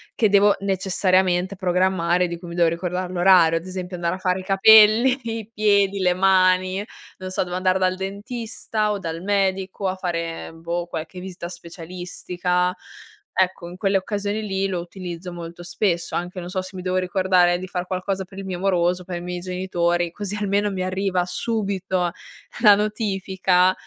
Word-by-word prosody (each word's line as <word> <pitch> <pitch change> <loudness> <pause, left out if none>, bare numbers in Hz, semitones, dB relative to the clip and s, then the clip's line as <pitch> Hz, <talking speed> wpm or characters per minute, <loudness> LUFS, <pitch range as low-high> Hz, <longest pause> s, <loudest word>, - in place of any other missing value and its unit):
che 215 - +3
devo 200 0 +5
necessariamente 185 -1 +1
programmare, 180 -1 +1
di 170 - -4
cui 175 - -10
mi 170 - -7
devo 170 -1 +4
ricordar 180 +2 -3
l'orario, 175 -2 +5
ad 165 - -6
esempio 185 -1 -6
andare 170 +1 -1
a - - -7
fare 185 0 0
i - - -7
capelli, 220 +6 +6
i 225 -1 -5
piedi, 200 -2 +2
le 180 -1 +3
mani, 185 0 +3 0.4
non 185 -1 -6
so, 185 - -1
devo 180 0 -4
andare 185 0 +2
dal 185 0 +1
dentista 215 +2 -3
o 205 - -2
dal 165 -2 -5
medico, 195 0 0
a 185 - -3
fare, 170 -3 -4
boh, 170 +1 -4
qualche 170 +2 -6
vista 180 -2 -7
specialistica. 180 +1 -3 0.6
Ecco, 185 -2 0
in 180 - -10
quelle 195 +1 0
occasioni 205 +2 -1
lì 195 -1 -1
lo 180 -2 -2
utilizzo 175 0 -7
molto 170 0 -8
spesso, 175 -1 -1
anche 180 +1 -4
non 175 - -7
so, 185 +1 -2
se 185 +1 -10
mi 185 - -5
devo 185 0 -1
ricordare 185 -1 +3
di 185 - -5
far 180 0 -4
qualcosa 190 +1 -2
per 190 +1 -15
il 195 - -5
mio 185 -2 -4
moroso, 180 -1 +1
per 180 -1 -5
i - - -6
miei 180 0 -4
genitori, 175 -1 -1
così 205 +2 -5
almeno 205 0 0
mi 190 -2 -3
arriva 185 0 0
subito 190 -3 -1 0.5
la 210 -3 +8
notifica, 195 -3 +1
185 Hz, 175 wpm, -22 LUFS, 180-195 Hz, 0.6 s, la